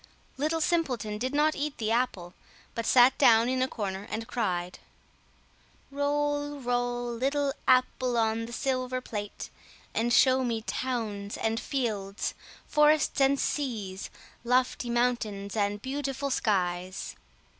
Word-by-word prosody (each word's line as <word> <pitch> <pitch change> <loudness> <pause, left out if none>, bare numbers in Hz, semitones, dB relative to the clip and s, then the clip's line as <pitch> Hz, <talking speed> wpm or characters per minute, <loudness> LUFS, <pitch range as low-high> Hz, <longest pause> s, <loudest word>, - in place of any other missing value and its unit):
Little 310 +4 0
Simpleton 250 -12 0
did 255 +3 -1
not 305 +1 +3
eat 295 0 -3
the 220 -1 -1
apple, 205 -7 -1 0.4
but 230 - -3
sat 250 +1 +6
down 230 0 +6
in 255 0 0
a 260 - +2
corner 200 -4 -4
and 225 +1 -4
cried— 180 -7 -2 1.1
"Roll, 290 0 -1
roll, 245 -1 -1
little 275 +3 0
apple 255 -1 +3
on 225 0 +1
the - - -9
silver 255 0 -1
plate, 205 -5 -6 0.4
and 235 +2 0
show 260 +1 +5
me 230 -3 -1
towns 215 -6 -3
and 225 0 0
fields, 215 -9 -2 0.3
forests 300 -1 +3
and 270 0 +4
seas, 215 -9 -2 0.3
lofty 250 0 +1
mountains 225 -5 -1
and 205 -1 -1
beautiful 275 0 -3
skies." 185 -5 -1
245 Hz, 125 wpm, -28 LUFS, 215-270 Hz, 1.1 s, sat